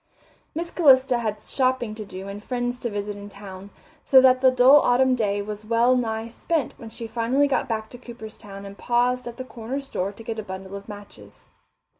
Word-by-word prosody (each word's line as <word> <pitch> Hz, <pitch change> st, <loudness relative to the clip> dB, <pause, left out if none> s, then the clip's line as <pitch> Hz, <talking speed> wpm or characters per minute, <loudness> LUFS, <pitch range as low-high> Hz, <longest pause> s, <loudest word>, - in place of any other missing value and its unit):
Miss 340 Hz, +1 st, -3 dB
Calista 260 Hz, -6 st, +5 dB
had 215 Hz, -2 st, -3 dB
shopping 255 Hz, -4 st, 0 dB
to 215 Hz, 0 st, -7 dB
do 190 Hz, 0 st, -8 dB
and 200 Hz, +1 st, -7 dB
friends 245 Hz, 0 st, -2 dB
to 240 Hz, -, -2 dB
visit 205 Hz, 0 st, -4 dB
in 205 Hz, 0 st, -9 dB
town, 195 Hz, -1 st, -10 dB, 0.3 s
so 265 Hz, -, +7 dB
that 255 Hz, -1 st, +5 dB
the 260 Hz, -, +7 dB
dull 255 Hz, +3 st, +7 dB
autumn 260 Hz, 0 st, +3 dB
day 205 Hz, -4 st, 0 dB
was 210 Hz, 0 st, -6 dB
well 230 Hz, +3 st, +3 dB
nigh 225 Hz, -2 st, -1 dB
spent 300 Hz, +5 st, -2 dB
when 225 Hz, -, -9 dB
she 230 Hz, -, -6 dB
finally 240 Hz, +5 st, +1 dB
got 275 Hz, -, 0 dB
back 220 Hz, -1 st, -2 dB
to 245 Hz, -, -10 dB
Cooperstown 220 Hz, -4 st, -10 dB
and 200 Hz, 0 st, -10 dB
paused 245 Hz, +1 st, +1 dB
at 235 Hz, 0 st, -7 dB
the 255 Hz, -, -6 dB
corner 250 Hz, +2 st, -5 dB
store 200 Hz, -8 st, -3 dB
to 215 Hz, +3 st, -13 dB
get 225 Hz, 0 st, -4 dB
a -, -, -4 dB
bundle 190 Hz, 0 st, -7 dB
of 200 Hz, +2 st, -9 dB
matches. 200 Hz, -, -12 dB
230 Hz, 205 wpm, -24 LUFS, 205-255 Hz, 0.3 s, so